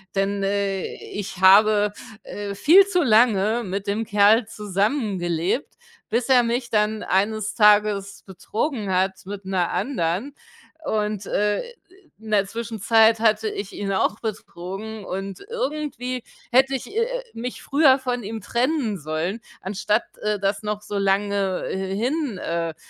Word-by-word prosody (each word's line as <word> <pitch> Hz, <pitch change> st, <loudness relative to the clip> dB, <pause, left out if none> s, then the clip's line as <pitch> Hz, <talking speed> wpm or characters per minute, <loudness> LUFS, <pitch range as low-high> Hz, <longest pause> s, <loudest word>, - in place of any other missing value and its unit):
denn, 195 Hz, +1 st, 0 dB
äh, 195 Hz, -1 st, -1 dB
ich 195 Hz, -2 st, -7 dB
habe, 205 Hz, +2 st, +6 dB, 0.3 s
äh, 205 Hz, -1 st, -6 dB
viel 360 Hz, -, +6 dB
zu 360 Hz, -3 st, +1 dB
lange 225 Hz, -2 st, +3 dB
mit 195 Hz, 0 st, -4 dB
dem 205 Hz, +3 st, -1 dB
Kerl 210 Hz, +1 st, +4 dB
zusammengelebt, 200 Hz, -, -1 dB, 0.3 s
bis 235 Hz, +1 st, 0 dB
er 260 Hz, -2 st, +6 dB
mich 240 Hz, +1 st, -2 dB
dann 215 Hz, 0 st, +1 dB
eines 215 Hz, +2 st, 0 dB
Tages 210 Hz, -2 st, +3 dB
betrogen 210 Hz, -, -3 dB
hat 190 Hz, +1 st, +2 dB
mit 200 Hz, -1 st, -7 dB
'ner 185 Hz, -2 st, 0 dB
anderen. 215 Hz, +1 st, -1 dB, 0.5 s
Und, 210 Hz, -2 st, -1 dB
äh, 205 Hz, +1 st, 0 dB, 0.6 s
in 220 Hz, 0 st, -11 dB
der 205 Hz, -2 st, +3 dB
Zwischenzeit 225 Hz, +1 st, +2 dB
hatte 220 Hz, -1 st, +2 dB
ich 200 Hz, -1 st, -6 dB
ihn 200 Hz, -1 st, -3 dB
auch 195 Hz, +2 st, 0 dB
betrogen 210 Hz, 0 st, -6 dB
und 195 Hz, +1 st, -5 dB
irgendwie 280 Hz, -, -3 dB, 0.3 s
hätte 265 Hz, +2 st, +4 dB
ich, 260 Hz, -, -5 dB
äh, -, -, +2 dB
äh, -, -, -2 dB
mich 245 Hz, +2 st, -6 dB
früher 280 Hz, -2 st, +4 dB
von 250 Hz, -2 st, -3 dB
ihm 220 Hz, +2 st, -5 dB
trennen 240 Hz, -, -1 dB
sollen, 160 Hz, +8 st, -3 dB, 0.2 s
anstatt, 210 Hz, +3 st, 0 dB, 0.2 s
äh, 210 Hz, 0 st, 0 dB
das 195 Hz, 0 st, -1 dB
noch 210 Hz, 0 st, -4 dB
so 205 Hz, -, -4 dB
lange 195 Hz, -1 st, 0 dB
hin 220 Hz, -, -2 dB
äh, 165 Hz, -2 st, -3 dB
210 Hz, 140 wpm, -23 LUFS, 195-235 Hz, 0.6 s, habe